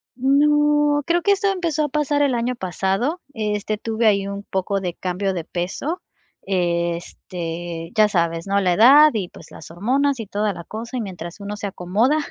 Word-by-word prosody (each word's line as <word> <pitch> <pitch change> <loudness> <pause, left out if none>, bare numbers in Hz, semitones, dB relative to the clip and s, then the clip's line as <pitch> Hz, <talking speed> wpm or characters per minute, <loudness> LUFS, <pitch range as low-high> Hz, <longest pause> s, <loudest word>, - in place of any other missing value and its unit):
No, 295 +2 +3
creo 345 +1 +2
que 400 +4 +4
eso 400 0 0
empezó 335 -5 -1
a - - -4
pasar 290 0 0
el 275 - +2
año 240 +1 -1
pasado, 195 - -1
este, 210 -1 -2
tuve 225 +1 0
ahí 200 -2 +2
un 200 0 -5
poco 195 0 -2
de 180 -2 -4
cambio 190 +2 -2
de 175 -3 -3
peso, 190 - -4 0.4
este, 170 -1 -3
ya 215 -1 +5
sabes, 170 -3 -1
¿no?, 200 +1 +2
la 180 -2 +2
edad 280 +9 +8
y, 205 -5 -2
pues, - - -15
las 155 - -11
hormonas 255 - 0
y 225 - -4
toda 205 +1 -1
la 170 - -8
cosa, 230 +7 -6
y 240 - -1
mientras 180 -3 -7
uno 205 +1 -5
se 205 - -4
acomoda, 205 - +1
210 Hz, 185 wpm, -21 LUFS, 180-280 Hz, 0.4 s, edad